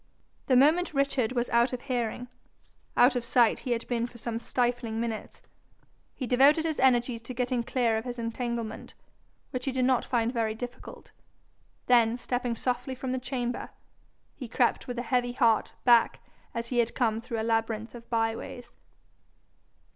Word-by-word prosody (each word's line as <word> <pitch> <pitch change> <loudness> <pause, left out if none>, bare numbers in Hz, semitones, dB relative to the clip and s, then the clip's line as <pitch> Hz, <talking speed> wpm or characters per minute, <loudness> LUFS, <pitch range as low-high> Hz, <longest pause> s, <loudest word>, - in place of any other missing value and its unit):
The 260 - +4
moment 310 +5 +4
Richard 270 -4 +1
was 240 -1 0
out 235 +2 +3
of 250 - -4
hearing 245 -2 -2 0.7
out 250 +2 +6
of 245 - -1
sight 235 -1 +3
he 255 - -5
had 230 -1 -4
been 235 -1 -1
for 240 - -14
some 230 0 -4
stifling 240 -2 -1
minutes 230 -2 -5 0.7
he 260 - -4
devoted 280 +6 +4
his 315 -2 -1
energies 245 -2 +3
to 240 +2 -8
getting 250 0 0
clear 235 -2 +1
of 220 - -9
his 245 -1 -5
entanglement, 235 -1 -4 0.6
which 255 -1 -4
he 270 - 0
did 255 -1 +1
not 255 -2 +3
find 235 -1 0
very 225 -2 0
difficult; 245 +2 -9 0.7
then 235 -1 +4
stepping 245 -1 -2
softly 250 +2 -2
from 255 0 -4
the 260 - -1
chamber, 245 -2 -3 0.7
he 255 - -7
crept 240 +1 +1
with 245 -1 -5
a 240 - -2
heavy 245 0 0
heart 230 -3 +2
back 235 -2 +5 0.4
as 230 0 -3
he 245 - 0
had 235 -1 +1
come 225 -3 +1
through 230 -1 -4
a - - -1
labyrinth 225 0 -1
of 235 -1 -12
by 225 -1 +1
ways. 245 +1 -9
245 Hz, 170 wpm, -28 LUFS, 230-255 Hz, 0.7 s, out